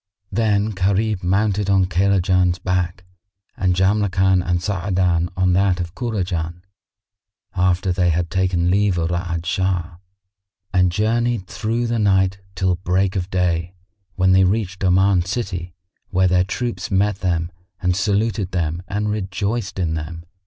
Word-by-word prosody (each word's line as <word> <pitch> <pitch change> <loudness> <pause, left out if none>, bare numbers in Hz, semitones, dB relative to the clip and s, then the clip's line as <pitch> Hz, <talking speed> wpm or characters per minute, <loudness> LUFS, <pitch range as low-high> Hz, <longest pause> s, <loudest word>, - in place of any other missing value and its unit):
Then 105 0 +1
Gharib 100 +1 0
mounted 100 +2 +1
on 95 -1 +4
Kaylajan's 90 -1 +2
back 90 -1 -2 0.5
and 90 -1 +1
Jamrkan 95 -1 +2
and 90 -1 0
Sa'adan 90 -2 0
on 95 -1 +2
that 95 0 +2
of 85 -1 -4
Kurajan, 90 -8 -3 0.9
after 90 0 +1
they 90 -1 +2
had 85 +1 -1
taken 90 -2 +1
leave 100 -1 +2
of 85 0 -1
Ra'ad 85 -1 -2
Shah; 90 -1 -1 0.8
and 90 -1 +3
journeyed 115 +2 0
through 115 +5 -2
the 115 -1 -1
night 95 -2 +2 0.2
till 90 -1 +1
break 95 +1 0
of 90 -1 -2
day, 90 -1 -1 0.4
when 95 0 +3
they 95 +1 +5
reached 95 0 -1
Oman 95 0 +3
city 90 -3 -4 0.4
where 95 0 +2
their 90 0 +3
troops 110 -2 -3
met 100 +1 +1
them 85 -3 -1 0.3
and 90 -1 +1
saluted 100 0 0
them 85 -1 -1
and 105 +3 -1
rejoiced 100 +1 -3
in 85 -4 0
them. 80 +1 -5
95 Hz, 140 wpm, -21 LUFS, 90-100 Hz, 0.9 s, they